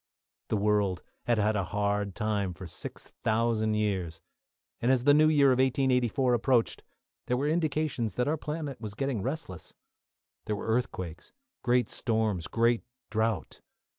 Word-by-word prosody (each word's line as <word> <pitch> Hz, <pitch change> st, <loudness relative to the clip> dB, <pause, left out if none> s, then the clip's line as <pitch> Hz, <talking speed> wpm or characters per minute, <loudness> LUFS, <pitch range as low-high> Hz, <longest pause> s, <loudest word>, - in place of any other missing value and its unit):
The 110 Hz, -, 0 dB
world 100 Hz, -3 st, +1 dB, 0.2 s
had 120 Hz, -1 st, +2 dB
had 105 Hz, +1 st, +2 dB
a 100 Hz, -3 st, 0 dB
hard 100 Hz, +1 st, -1 dB
time 105 Hz, -4 st, -1 dB
for 95 Hz, -, -8 dB
six 85 Hz, -, -7 dB
thousand 110 Hz, -1 st, +1 dB
years, 95 Hz, -6 st, -1 dB, 0.6 s
and, 120 Hz, +2 st, +3 dB
as 130 Hz, -2 st, +2 dB
the 145 Hz, +2 st, +6 dB
new 155 Hz, +1 st, +6 dB
year 145 Hz, -3 st, +5 dB
of 130 Hz, -1 st, +3 dB
1884 130 Hz, -1 st, +2 dB
approached, 120 Hz, 0 st, +2 dB, 0.5 s
there 125 Hz, -, +1 dB
were 140 Hz, +3 st, 0 dB
indications 155 Hz, -, 0 dB
that 125 Hz, -, 0 dB
our 155 Hz, -, +2 dB
planet 150 Hz, -3 st, -5 dB
was 105 Hz, -2 st, -6 dB
getting 135 Hz, -4 st, -1 dB
restless. 130 Hz, -, -5 dB, 0.7 s
There 105 Hz, -, -1 dB
were 100 Hz, -, -6 dB
earthquakes, 95 Hz, -7 st, -2 dB, 0.3 s
great 125 Hz, 0 st, +2 dB
storms, 110 Hz, -6 st, -1 dB
great 115 Hz, 0 st, +2 dB, 0.3 s
drought. 110 Hz, -1 st, -1 dB
115 Hz, 150 wpm, -29 LUFS, 105-130 Hz, 0.7 s, the